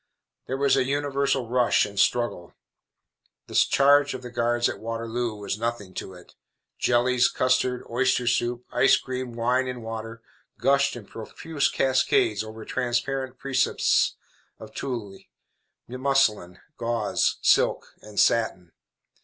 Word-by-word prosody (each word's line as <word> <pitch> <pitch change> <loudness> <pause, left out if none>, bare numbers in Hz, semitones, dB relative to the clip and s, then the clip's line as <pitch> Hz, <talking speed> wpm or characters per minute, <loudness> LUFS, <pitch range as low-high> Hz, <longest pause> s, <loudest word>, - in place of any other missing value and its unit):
There 130 - -2
was 140 0 +3
a 135 - +2
universal 140 -2 -1
rush 125 0 +2
and 100 -1 -6
struggle. 120 -8 0 0.9
The - - -12
charge 145 0 +4
of 130 - -8
the 125 - -8
guards 120 0 +1
at - - -5
Waterloo 115 0 -3
was 105 0 -4
nothing 115 -5 -4
to 95 - -7
it. 90 - -16 0.5
Jellies, 125 +1 +3
custard, 130 0 0
oyster 130 +1 +1
soup, 120 +1 0
ice - - +4
cream, 130 -2 -5
wine 125 +3 0
and 125 -2 -6
water, 115 0 -7 0.3
gushed 140 0 +2
in 120 -4 -9
profuse 140 +8 -3
cascades 135 - +1
over 110 0 -9
transparent 130 +1 -2
precipices 135 0 +1 0.4
of - - -12
tulle, 110 -8 -5 0.7
muslin, 125 -9 0 0.2
gauze, 115 -2 0
silk - - +2
and 105 -1 -6
satin. 95 -7 +1
120 Hz, 130 wpm, -25 LUFS, 115-130 Hz, 0.9 s, charge